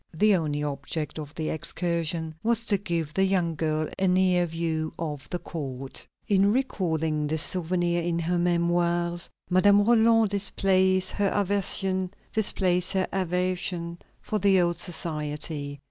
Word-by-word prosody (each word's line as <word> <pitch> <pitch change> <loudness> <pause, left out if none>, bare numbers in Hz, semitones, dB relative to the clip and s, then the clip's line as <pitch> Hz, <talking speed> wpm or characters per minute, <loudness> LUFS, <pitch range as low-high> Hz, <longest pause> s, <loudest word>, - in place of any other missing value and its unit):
The 210 +5 +4
only 150 -4 -1
object 145 +2 -4
of 150 -1 -8
the 155 -1 -2
excursion 165 0 -2
was 230 0 +1
to 205 -3 +2
give 170 -6 -3
the 190 - +2
young 185 -4 +1
girl 155 0 -1
a 190 - +2
near 180 -1 +3
view 160 -1 -2
of 150 -4 -5
the 180 - -2
court. 135 -6 -6 0.2
In 200 0 +4
recalling 160 - -1
this 160 +1 +3
souvenir 175 -1 +1
in 170 0 -1
her 170 +1 0
Memoirs, 175 0 +1 0.2
Madame 200 +3 +4
Roland 225 -2 +4
displays 190 -2 +2
her 205 -1 0
aversion 195 -1 0 0.2
for 185 -1 -1
the 195 -1 +4
old 175 -1 +1
society. 150 -4 -3
175 Hz, 130 wpm, -26 LUFS, 160-190 Hz, 0.2 s, The